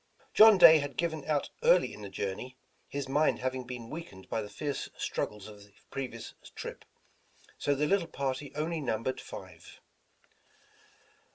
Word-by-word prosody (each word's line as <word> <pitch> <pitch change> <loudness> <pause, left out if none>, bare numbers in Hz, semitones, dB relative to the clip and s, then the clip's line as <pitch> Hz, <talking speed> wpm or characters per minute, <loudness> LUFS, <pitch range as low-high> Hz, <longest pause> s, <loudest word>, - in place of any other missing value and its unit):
John 215 -1 +9
Day 165 -3 +10
had 145 -1 -5
given 160 -3 -1
out 150 -2 0
early - - +4
in - - -10
the 100 - -7
journey, 100 +7 -5 0.3
his 140 -1 -4
mind 145 +3 +2
having 130 0 -3
been 120 -2 -7
weakened 155 - -8
by 110 - -1
the 105 - -7
fierce 145 +4 -4
struggles 105 -1 -3
of 105 -1 -12
the 100 0 -21 0.2
previous 125 -4 -5 0.2
trip, - - -7 0.7
so 145 - +1
the 145 +2 +1
little 190 +1 +2
party 135 -1 -3
only 160 +2 -2
numbered 125 -1 -2
five. - - -11
135 Hz, 155 wpm, -30 LUFS, 115-155 Hz, 0.7 s, Day